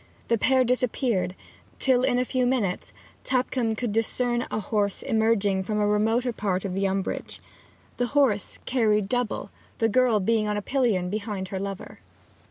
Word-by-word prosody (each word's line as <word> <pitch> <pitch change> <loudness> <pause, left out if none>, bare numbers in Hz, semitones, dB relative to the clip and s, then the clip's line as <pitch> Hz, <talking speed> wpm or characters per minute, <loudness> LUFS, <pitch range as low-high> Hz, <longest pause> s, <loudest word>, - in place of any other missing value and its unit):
The 230 - +3
pair 260 +2 +4
disappeared; 245 -6 0 0.4
till, 255 -2 +3
in 255 -1 +2
a 250 - +1
few 255 -1 0
minutes, 220 -8 -1 0.3
Tupcombe 250 -3 0
could 235 0 -2
discern 240 +2 0
a - - -2
horse 205 -1 -1
emerging 220 -5 +2
from 210 +3 -2
a 210 - +2
remoter 225 +4 +1
part 195 -3 -2
of 190 - -3
the 195 +1 +1
umbrage. 195 0 -3 0.6
The 245 - 0
horse 225 -8 +2
carried 215 -5 +2
double, 245 0 -2 0.3
the 225 -1 +2
girl 245 -1 +3
being 215 +2 +1
on 210 0 -1
a - - -1
pillion 215 -10 +1
behind 205 -3 -4
her 190 - -3
lover. 195 0 -6
220 Hz, 165 wpm, -26 LUFS, 200-245 Hz, 0.6 s, pair